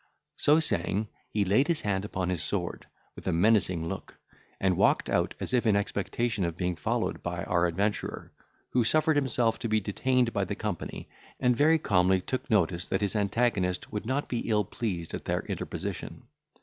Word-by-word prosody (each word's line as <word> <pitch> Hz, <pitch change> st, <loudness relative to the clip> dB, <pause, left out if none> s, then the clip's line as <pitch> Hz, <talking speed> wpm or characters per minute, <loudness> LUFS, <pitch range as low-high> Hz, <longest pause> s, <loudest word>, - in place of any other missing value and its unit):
So 150 Hz, +2 st, +4 dB
saying, 105 Hz, -, -1 dB, 0.2 s
he 105 Hz, -2 st, 0 dB
laid 105 Hz, +10 st, +3 dB
his 170 Hz, -3 st, +1 dB
hand 95 Hz, -2 st, -1 dB
upon 95 Hz, -3 st, -2 dB
his 90 Hz, -4 st, -1 dB
sword -, -, -3 dB, 0.3 s
with -, -, -10 dB
a -, -, +2 dB
menacing 90 Hz, -2 st, +2 dB
look, -, -, -6 dB, 0.4 s
and 95 Hz, -1 st, +2 dB
walked -, -, +3 dB
out -, -, +1 dB
as -, -, -4 dB
if 120 Hz, -2 st, +2 dB
in 105 Hz, -, +4 dB
expectation 100 Hz, +1 st, -1 dB
of 85 Hz, -1 st, -2 dB
being 90 Hz, 0 st, -1 dB
followed 75 Hz, -, -1 dB
by 85 Hz, -1 st, -3 dB
our 90 Hz, -1 st, +2 dB
adventurer, 100 Hz, +5 st, -2 dB, 0.4 s
who 125 Hz, -, +3 dB
suffered 155 Hz, +6 st, +3 dB
himself 125 Hz, -5 st, +3 dB
to 115 Hz, -, -3 dB
be 110 Hz, 0 st, +3 dB
detained 120 Hz, +4 st, +1 dB
by 100 Hz, -, +1 dB
the 95 Hz, +2 st, -3 dB
company, 105 Hz, -5 st, -5 dB, 0.3 s
and 125 Hz, -2 st, +3 dB
very 155 Hz, +6 st, +5 dB
calmly 95 Hz, -, +3 dB
took 130 Hz, +7 st, -4 dB
notice, 90 Hz, -5 st, +1 dB
that 95 Hz, -, -1 dB
his 100 Hz, +1 st, 0 dB
antagonist 100 Hz, -3 st, 0 dB
would 105 Hz, 0 st, -4 dB
not 135 Hz, +3 st, -1 dB
be 120 Hz, -, -2 dB
ill 105 Hz, -2 st, +2 dB
pleased 90 Hz, -6 st, -4 dB
at -, -, -5 dB
their -, -, 0 dB
interposition. -, -, -5 dB
105 Hz, 185 wpm, -28 LUFS, 90-120 Hz, 0.4 s, very